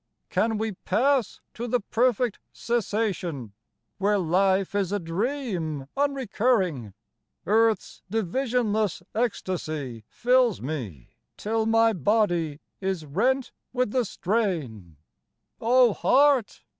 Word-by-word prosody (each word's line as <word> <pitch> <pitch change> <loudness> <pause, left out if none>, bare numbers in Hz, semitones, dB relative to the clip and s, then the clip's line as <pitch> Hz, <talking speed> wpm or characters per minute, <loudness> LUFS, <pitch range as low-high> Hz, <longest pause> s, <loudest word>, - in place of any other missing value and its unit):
Can 225 -1 +1
we 220 +1 -1
pass 240 +6 0
to 240 +2 -5
the 245 +1 +1
perfect 240 +1 +1
cessation 195 - -2 0.5
where 205 +1 +2
life 190 +2 +2
is 200 -2 0
a 205 - +1
dream 180 - -3
unrecurring? 220 - 0 0.5
Earth's 220 +1 +1
divisionless 220 -2 0
ecstasy 155 - -3
fills 250 -3 +2
me, 120 - -6 0.3
till 220 +1 -1
my 225 0 +4
body 175 - +1 0.2
is 190 -5 -2
rent 245 - 0 0.2
with 250 -4 0
the 255 0 +2
strain, 165 - -2 0.6
Oh, 245 0 +4
Heart 275 -2 +3
210 Hz, 100 wpm, -26 LUFS, 170-240 Hz, 0.6 s, my